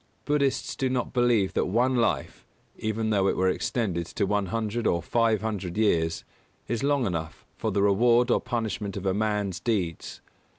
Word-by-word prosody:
Buddhists 145 -2 0
do 130 - 0
not 125 -1 -2
believe 120 -6 +2
that - - +1
one 125 +7 +2
life 120 -1 0 0.3
even 110 0 -2
though 100 -2 +2
it - - 0
were 95 0 +3
extended 90 -4 -1
to 100 - -1
one 100 0 0
hundred 115 +3 -2
or 85 - +2
five 115 +2 +1
hundred 100 -4 -3
years 80 -7 +1 0.4
is 115 -1 -2
long 140 -2 +2
enough 80 -5 -4
for - - -2
the 100 - +1
reward 120 +4 +4
or - - +3
punishment 110 -5 -3
of 100 - -6
a 95 - +2
man's 105 -3 -1
deeds. 95 -9 -2
110 Hz, 175 wpm, -26 LUFS, 95-120 Hz, 0.4 s, reward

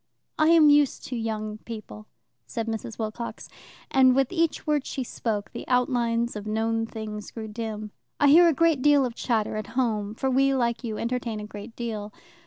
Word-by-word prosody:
"I 310 - +5
am 320 -3 +7
used 290 -2 +3
to 255 - -3
young 215 -2 -3
people," 215 -1 -9 0.4
said 230 -3 -3
Mrs. 225 0 -5
Wilcox, 225 +1 -5 0.4
and 260 -1 +5
with 270 -1 +2
each 335 -2 0
word 300 -3 +1
she 265 - -4
spoke 215 -4 -3
the - - -8
outlines 240 -2 +1
of 210 0 -6
known 225 +1 0
things 215 -2 -6
grew 220 -1 -7
dim. 215 -1 -5 0.3
"I 290 - +5
hear 340 +4 +8
a - - +5
great 325 -2 +2
deal 285 -1 +5
of 245 - -4
chatter 220 -3 -1
at 215 - -4
home, 215 -4 0
for 265 +3 -1
we, 270 +1 +3
like 235 -1 0
you, 220 -3 -3
entertain 235 -2 -2
a 210 - -6
great 210 +2 -10
deal. 215 -3 -4
230 Hz, 190 wpm, -26 LUFS, 215-265 Hz, 0.4 s, hear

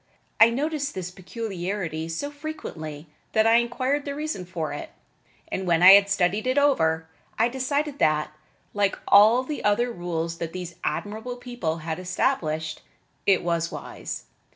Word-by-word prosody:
I 225 - +9
noticed 290 +3 -2
this 180 -1 -4
peculiarity 185 -4 -4
so 225 - -3
frequently 175 - -7 0.3
that 220 0 +4
I 225 +1 +6
inquired 255 +4 0
the 280 0 -4
reason 300 -11 -4
for 170 -3 -4
it, - - -6 0.6
and 190 -1 -3
when 170 0 +3
I 185 - +11
had 200 0 +7
studied 200 +3 +1
it 255 +2 +1
over 160 - +2 0.3
I 230 - +4
decided 280 +3 -2
that, 150 0 +2 0.4
like 205 -1 +1
all 220 +5 +7
the 295 +2 -5
other 235 +4 +2
rules 170 -3 -3
that 165 -1 -4
these 180 -2 -6
admirable 220 +4 -3
people 245 -10 -4
had 160 +1 -3
established, 160 - -1 0.5
it 195 -2 +4
was 170 -1 0
wise. - - -6
200 Hz, 155 wpm, -25 LUFS, 170-250 Hz, 0.6 s, I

